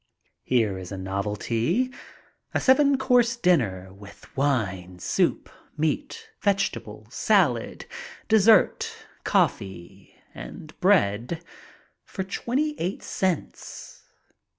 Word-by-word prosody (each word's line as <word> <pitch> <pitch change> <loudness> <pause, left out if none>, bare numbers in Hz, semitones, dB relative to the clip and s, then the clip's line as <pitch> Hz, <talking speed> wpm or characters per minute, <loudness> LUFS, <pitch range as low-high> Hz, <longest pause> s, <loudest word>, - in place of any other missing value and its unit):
Here 110 -7 +1
is 90 0 -8
a 100 - -4
novelty. 110 - -1 0.6
A - - +4
seven 280 +1 +4
course 250 -3 +3
dinner, 105 - +1
with 100 +1 -15
wine, 95 -10 -1
soup, - - 0 0.3
meat, 285 - -2
vegetables, 115 - -1
salad, 165 - +2 0.4
dessert, 220 -2 +4 0.3
coffee, 95 0 -1 0.2
and 110 - -9
bread 160 - +2 0.6
for 190 - -5
twenty 260 +10 -1
eight 180 +3 -3
cents. 185 -5 -3
145 Hz, 90 wpm, -25 LUFS, -, 0.6 s, A